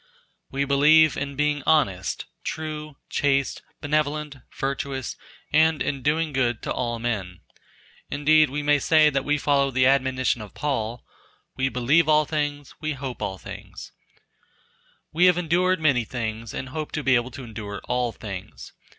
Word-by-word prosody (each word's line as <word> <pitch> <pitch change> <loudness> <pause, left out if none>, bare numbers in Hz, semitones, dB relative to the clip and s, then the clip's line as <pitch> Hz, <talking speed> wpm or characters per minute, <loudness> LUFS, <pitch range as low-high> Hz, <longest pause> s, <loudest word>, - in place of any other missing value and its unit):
We 140 +1 -1
believe 150 +2 +5
in 140 0 -4
being 150 0 +1
honest, 100 -13 +1 0.2
true, 155 -2 -5
chaste, 140 -1 0 0.2
benevolent, 150 0 -1 0.2
virtuous, 135 -1 -3 0.4
and 160 0 +4
in 140 -2 -2
doing 155 +2 0
good 120 -4 0
to - - -3
all 120 -2 -2
men; 105 -7 -3 0.7
indeed 155 0 +4
we 145 +2 -3
may 145 0 +3
say 155 0 +5
that 135 -1 0
we 150 +1 +1
follow 140 -1 +2
the 130 -1 +2
admonition 130 -3 +2
of 105 - -10
Paul 120 -5 -2 0.5
"we 130 0 0
believe 140 +7 +2
all 155 0 +5
things 145 -2 -3
we 155 -1 -1
hope 130 -2 -6
all 95 -1 -3
things," - - -10 1.2
we 175 +3 +4
have 180 -1 +5
endured 180 +2 +2
many 140 -6 +3
things 110 -1 -4
and 130 - -5
hope 155 +2 -5
to 150 - -2
be 135 0 +3
able 120 0 +2
to 130 - -9
endure 105 -3 -7
all 125 -1 0
things. 95 - -8
140 Hz, 155 wpm, -24 LUFS, 125-150 Hz, 1.2 s, believe